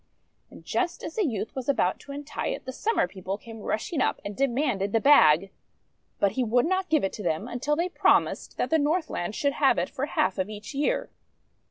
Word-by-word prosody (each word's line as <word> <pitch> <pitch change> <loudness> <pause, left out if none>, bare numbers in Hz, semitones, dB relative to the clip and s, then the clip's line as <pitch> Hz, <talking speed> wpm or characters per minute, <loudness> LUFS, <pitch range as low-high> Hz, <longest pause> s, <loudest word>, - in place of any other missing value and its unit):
And - - -14
just 360 -2 -1
as 320 - -5
the 420 -6 +1
youth 220 -4 -3
was 260 0 -4
about 190 -9 +1
to 280 - -11
untie 285 +1 -5
it, - - -4
the 260 - -4
Summer 440 - 0
People 190 0 -5
came 225 +1 -11
rushing 225 +8 -2
up, - - +1
and 205 0 -5
de 275 +4 +2
manded 235 -7 -1
the 225 - +4
bag. 195 - +6 0.7
But 200 - +2
he 255 +5 -1
would 240 +1 +2
not 375 +2 0
give 310 -2 +3
it 195 - -1
to 210 - -7
them, 165 +5 -1
until 250 +5 -1
they 340 +3 0
promised 365 - +1
that - - -1
the 320 - +4
Northland 295 - -1
should 280 -1 0
have - - +3
it - - -1
for - - -3
half - - 0
of 185 +2 -1
each 215 +4 -8
year. 285 +2 -1
250 Hz, 220 wpm, -26 LUFS, 205-295 Hz, 0.7 s, bag